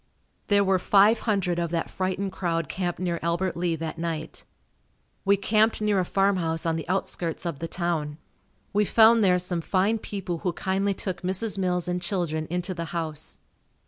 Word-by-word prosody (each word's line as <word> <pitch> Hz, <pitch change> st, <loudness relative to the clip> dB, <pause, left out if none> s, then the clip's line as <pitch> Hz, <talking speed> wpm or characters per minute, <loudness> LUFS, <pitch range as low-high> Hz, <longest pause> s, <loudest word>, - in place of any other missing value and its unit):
There 205 Hz, -1 st, +4 dB
were 190 Hz, -1 st, +2 dB
five 205 Hz, +4 st, +5 dB
hundred 180 Hz, -4 st, +1 dB
of 170 Hz, -1 st, -1 dB
that 165 Hz, 0 st, -1 dB
frightened 190 Hz, +1 st, -2 dB
crowd 170 Hz, -4 st, -1 dB
camped 175 Hz, 0 st, -3 dB
near 175 Hz, -2 st, -1 dB
Albert 170 Hz, +2 st, -1 dB
Lea 170 Hz, -1 st, 0 dB
that 160 Hz, 0 st, -5 dB
night. 165 Hz, -1 st, -4 dB, 0.8 s
We 200 Hz, 0 st, +4 dB
camped 215 Hz, +2 st, +2 dB
near 210 Hz, -2 st, +2 dB
a 180 Hz, -, +1 dB
farm 195 Hz, +1 st, +2 dB
house 165 Hz, -2 st, -1 dB
on 165 Hz, -1 st, +1 dB
the 160 Hz, +1 st, -5 dB
outskirts 180 Hz, -3 st, -2 dB
of 165 Hz, -5 st, -3 dB
the 165 Hz, -, -3 dB
town. 165 Hz, -4 st, -2 dB, 0.6 s
We 210 Hz, +1 st, +3 dB
found 225 Hz, +2 st, +6 dB
there 180 Hz, -2 st, +4 dB
some 175 Hz, -1 st, -2 dB
fine 195 Hz, +7 st, +1 dB
people 190 Hz, -5 st, -4 dB
who 180 Hz, 0 st, -1 dB
kindly 195 Hz, +1 st, 0 dB
took 185 Hz, -2 st, -4 dB
Mrs. 195 Hz, +3 st, -1 dB
Mills 180 Hz, -2 st, 0 dB
and 180 Hz, 0 st, -1 dB
children 170 Hz, -4 st, -2 dB
into 180 Hz, +2 st, -2 dB
the 170 Hz, -1 st, -4 dB
house. 155 Hz, -2 st, -4 dB
180 Hz, 180 wpm, -26 LUFS, 170-195 Hz, 0.8 s, found